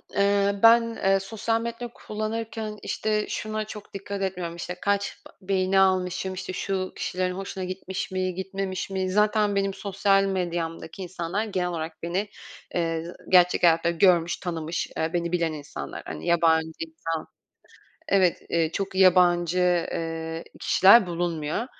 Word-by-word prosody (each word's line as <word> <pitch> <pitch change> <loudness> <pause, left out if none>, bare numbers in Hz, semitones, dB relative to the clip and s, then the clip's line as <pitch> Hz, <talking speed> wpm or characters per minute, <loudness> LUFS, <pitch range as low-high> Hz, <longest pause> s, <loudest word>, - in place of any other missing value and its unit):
eee, 200 0 +3
ben, 230 0 +6
eee, 195 0 +4
sosyal 225 +3 -2
medya 235 +1 -4
kullanırken, 215 0 -4
işte, 215 -1 -1
şuna 215 0 -3
çok 210 -1 -10
dikkat 200 0 -5
etmiyorum: 180 -3 -3
İşte, 175 +1 -5
kaç 200 0 0 0.2
beğeni 190 0 +1
almışım, 185 0 +1
işte, 185 0 -5
şu 190 0 -2
kişilerin 180 0 -2
hoşuna 190 0 -5
gitmiş 185 +1 -5
mi, 185 -1 -1
gitmemiş 190 0 -4
mi, 190 -1 -1
zaten 210 +1 +2
benim 195 0 +1
sosyal 195 0 +2
medyamdaki 175 -2 -3
insanlar 180 +3 -3
genel 185 -4 -1
olarak 160 -1 -5
beni, 190 +5 -2 0.5
eee, 165 -2 0 0.3
gerçek 180 -1 +5
hayatta 170 0 +4
görmüş, 170 0 +3
tanımış, 165 -2 -3
eee, 160 +2 -1
beni 170 -1 -1
bilen 170 -2 0
insanlar. 150 -1 -7
Hani - - -7
yabancı 165 -1 +3
insan 165 0 -4 0.8
Evet. 185 -3 +3
Eee, 165 -1 +1
çok 195 +1 -3
yabancı, 180 -2 +4 0.3
eee, 165 0 -4 0.2
kişiler 195 +1 +6
bulunmuyor. 170 +3 -2
185 Hz, 140 wpm, -26 LUFS, 170-200 Hz, 0.8 s, ben